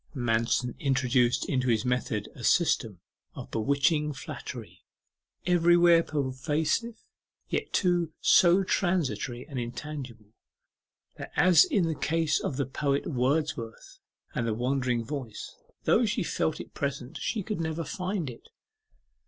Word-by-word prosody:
Manston 120 0 0
introduced 130 -3 +2
into 130 -2 0
his 115 -1 +1
method 125 -4 -1
a 120 - -11
system 115 - +2 0.3
of - - -9
bewitching 140 +6 +1
flattery, 135 - -8 0.6
everywhere 175 -1 +5
pervasive, 150 - -2 0.5
yet, - - -2
too, 175 -4 +1
so 180 +2 +5
transitory 155 -10 -1
and 140 -4 -5
intangible, 120 -3 -7 0.8
that, - - -8
as 180 - +6
in 235 - +1
the 165 - 0
case 160 -1 0
of 130 - -3
the 140 - 0
poet 140 +2 -1
Wordsworth 130 -4 -2 0.3
and 115 -2 -1
the 110 - 0
Wandering 125 -1 0
Voice, 125 -5 -6 0.3
though 235 0 +3
she 210 -1 0
felt 160 -1 -1
it - - -9
present, 140 -2 -4
she 215 -4 -2
could 210 -3 -3
never 160 +1 -2
find 185 0 -3
it. 120 -2 -9
140 Hz, 130 wpm, -28 LUFS, 125-170 Hz, 0.8 s, as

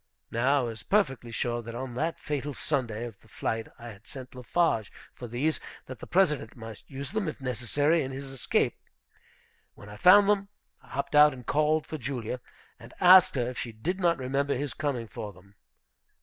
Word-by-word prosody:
Now 135 +5 +3
I - - -2
was 115 -2 -5
perfectly 135 - +1
sure 120 +1 -2
that 115 0 -8
on 130 0 -5
that 160 +7 -1
fatal 145 -1 -3
Sunday 120 -6 -2
of 115 -5 -9
the - - -23
flight 115 0 -3
I 120 -1 -9
had 110 0 -13
sent 130 -2 -9
Lafarge 125 - 0 0.2
for 120 - -8
these, 135 +7 0 0.3
that 130 - -9
the - - -9
President 150 - +2
might 115 -2 -9
use 140 +1 -6
them, 215 -4 -1
if 155 - -4
necessary, 135 +6 +1
in 130 - -3
his 135 0 -6
escape. 135 - 0 1.0
When 105 - -13
I 105 - -10
found 195 - +7
them, 200 -1 +2 0.3
I - - -21
hopped 140 +2 -4
out 150 0 +7
and 125 -2 -11
called 155 +3 +2
for 155 - -6
Julia, 125 -1 -4 0.4
and - - -13
asked 185 -2 +8
her 120 -2 0
if 125 - -5
she 120 - -4
did 175 - -3
not 170 -2 +3
remember 140 +2 0
his 140 0 -3
coming 140 -7 -2
for 105 -1 -7
them. 95 +2 -19
130 Hz, 195 wpm, -28 LUFS, 120-150 Hz, 1.0 s, asked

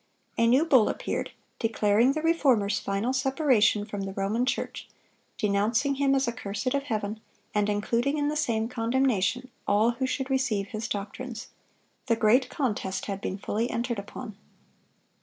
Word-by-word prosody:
A 230 - +3
new 260 +7 +4
bull 260 -9 +5
appeared, - - -3 0.3
declaring 225 +2 +3
the 310 +1 -3
Reformer's 255 -11 +3
final 200 +6 -1
separation 260 -6 +2
from 205 -2 -5
the 195 0 -4
Roman 210 +6 0
Church, - - -3 0.5
denouncing 220 +7 +1
him 275 0 +2
as 270 -1 +1
accursed 220 0 -3
of 280 - +1
Heaven, 215 -3 -3 0.3
and 210 0 +1
including 235 +7 0
in 290 -1 +1
the 300 - -1
same 230 -7 0
condemnation 245 0 0 0.2
all 210 +3 +4
who 260 +2 -2
should 265 +1 -3
receive 220 -7 0
his 215 0 -4
doctrines. 225 +4 -5 0.6
The 230 - +3
great 230 +4 +3
contest 210 -8 -2
had 195 -1 -4
been 190 - -3
fully 220 +4 -2
entered 235 -2 -2
upon. 210 +2 -8
230 Hz, 155 wpm, -27 LUFS, 205-265 Hz, 0.6 s, bull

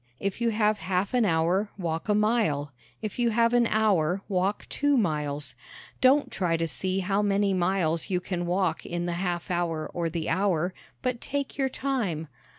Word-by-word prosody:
If 200 +4 -3
you 235 - +3
have 215 -1 +2
half 185 +4 -1
an 245 -3 +3
hour 175 +4 +2
walk 165 +1 -3
a 210 - +4
mile. 210 - +1 0.3
If 215 +2 -4
you 240 -1 +3
have 230 +1 +3
an 240 -1 +4
hour 195 -5 +2
walk 195 +1 0
two 285 -1 +1
miles. 150 - -1 0.5
Don't 270 +3 +4
try 170 -3 0
to 165 0 -1
see 190 +4 -2
how 195 +2 +1
many 200 -1 +2
miles 175 -3 +1
you 180 -2 +1
can 175 -1 -3
walk 180 -2 0
in 175 0 -3
the 175 - -1
half 175 -1 -2
hour 170 -3 -1
or 170 -1 -1
the 165 -1 -3
hour, 185 -1 +1 0.3
but 250 -2 -1
take 280 -1 -3
your 265 -1 +2
time. 225 - -2
190 Hz, 180 wpm, -27 LUFS, 170-215 Hz, 0.5 s, a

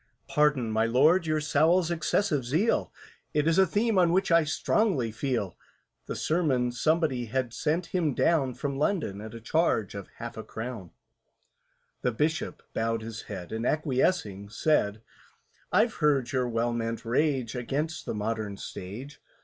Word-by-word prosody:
"Pardon, 145 -6 +2
my 110 +1 +2
Lord, 155 +9 +4
your 155 0 +1
SOWLS' 160 +4 +3
excessive 170 -3 +1
zeal, 160 - +1 0.4
It 150 +1 +2
is 165 +2 +3
a 190 - +6
theme 210 +3 +2
on 175 -2 +4
which 185 +1 +2
I 165 -1 +6
strongly 150 - +1
feel." 115 - -2 0.5
(The - - -4
sermon 140 -7 +1
somebody 145 -1 +1
had 120 +1 -2
sent 165 +5 0
him 165 -7 +1
down 135 -7 +2
From 140 -2 -3
London, 150 - 0
at 110 +1 -8
a - - -7
charge 115 - +1
of 100 -2 -7
half - - -7
a - - -5
crown.) 110 -5 -6 1.1
The 125 - +1
Bishop 155 +7 -1
bowed 115 0 -1
his 115 0 -6
head, 90 -4 -6
And, 110 +1 -3
acquiescing, 130 - 0
said, 110 -4 +1 0.7
"I've 220 +5 +3
heard 145 -5 +1
your 125 -3 0
well 120 +1 0
meant 115 -1 -3
rage 130 -1 +1
Against 145 +6 -3
the - - -2
Modern 105 -1 -3
Stage. 110 +11 -8
135 Hz, 155 wpm, -28 LUFS, 115-160 Hz, 1.1 s, a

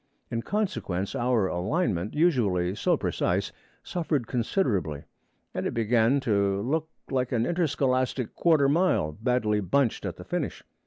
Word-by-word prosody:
In 115 -1 -1
consequence, 150 - -2
our 120 -4 +1
alignment, 95 - -1
usually 105 - +2
so 105 - +1
precise, - - -1 0.3
suffered 155 -7 -1
considerably; 110 - -1 0.5
and - - -2
it - - -4
began 115 +3 +3
to 100 -4 +1
look 160 +6 -1 0.2
like 130 -2 0
an 120 -2 +1
interscholastic 130 -6 0
'quarter 155 -5 +3
mile' 155 - +2
badly 110 +2 0
bunched 115 +6 +1
at - - -5
the - - -10
finish. - - -3
120 Hz, 135 wpm, -27 LUFS, 100-145 Hz, 0.5 s, began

